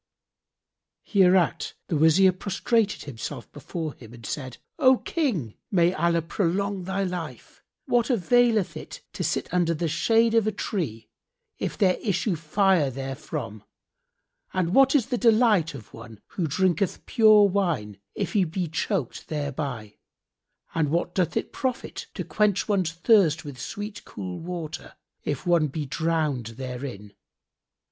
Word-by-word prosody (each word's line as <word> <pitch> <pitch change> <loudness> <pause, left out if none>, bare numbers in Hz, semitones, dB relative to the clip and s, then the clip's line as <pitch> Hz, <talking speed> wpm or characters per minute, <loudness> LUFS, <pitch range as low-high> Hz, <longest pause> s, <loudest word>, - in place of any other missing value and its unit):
Hereat 185 -3 +3
the 165 - -2
Wazir 160 +5 +5
prostrated 205 +3 0
himself 130 -6 -7
before 160 -4 -5
him 115 -1 -13
and 115 -2 -13
said, 130 +2 -5 0.2
"O 260 0 +6
King, 210 - -2 0.2
may 175 -2 +3
Allah 170 -1 +1
prolong 190 +2 -1
thy 190 +1 -1
life! 180 -4 -6 0.2
What 240 -2 +2
availeth 235 -2 +3
it - - -8
to - - -3
sit - - -1
under 170 -2 +2
the 165 +2 -1
shade 225 +8 +2
of 225 -2 +3
a - - +2
tree, 155 - -4 0.5
if - - -3
there 185 -3 +3
issue 200 -2 0
fire 165 -1 +2
therefrom, 135 -4 -6 0.9
and 180 -1 0
what 270 +3 +5
is 260 -6 +4
the 250 -2 -2
delight 220 - +4
of 115 -6 -12
one 115 -2 -11
who 175 -4 -2
drinketh 185 +3 0
pure 215 -2 +6
wine, 170 - -1 0.2
if - - -3
he 205 -3 +4
be 175 +1 -2
choked 160 - -2
thereby, 140 -8 -4 0.7
and 160 -3 +1
what 170 +3 -1
doth 180 -4 0
it - - -3
profit 255 -2 -3
to - - -3
quench 210 -2 +1
one's 190 -6 +1
thirst 170 -4 +3
with 135 -4 -8
sweet 205 - -6
cool 90 -3 -7
water, 170 -3 -6 0.3
if 145 -3 -3
one 170 -3 +3
be 150 +2 -4
drowned 150 -7 -1
therein? 125 -6 -6
170 Hz, 140 wpm, -25 LUFS, 145-200 Hz, 0.9 s, O